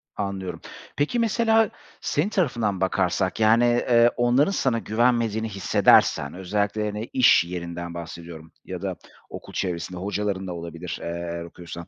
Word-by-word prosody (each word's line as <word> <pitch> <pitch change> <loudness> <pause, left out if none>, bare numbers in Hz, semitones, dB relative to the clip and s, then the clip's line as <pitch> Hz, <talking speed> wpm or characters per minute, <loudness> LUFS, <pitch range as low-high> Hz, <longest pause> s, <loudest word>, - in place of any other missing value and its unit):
Anlıyorum. 95 -3 -4 0.4
Peki, 150 +12 0
mesela 225 -1 +3 0.3
senin 155 +8 0
tarafından 120 - 0
bakarsak, 95 0 0
yani, 110 +2 +5
eee, 120 0 +4
onların 125 +8 +3
sana 130 -11 +1
güvenmediğini 115 -1 +1
hissedersen 90 -6 +3
özellikle, 100 +3 -1
hani, 105 +2 -4
iş 125 -8 +6
yerinden 85 0 -6
bahsediyorum 85 -1 -9
ya - - -6
da - - -3 0.3
okul - - -10
çevresinde 90 -1 -3
hocaların 100 0 -2
da 90 - -4
olabilir, 85 0 -6
eee, - - -5
eğer 85 0 -4
okuyorsan. 85 0 -9
100 Hz, 135 wpm, -24 LUFS, 85-120 Hz, 0.4 s, iş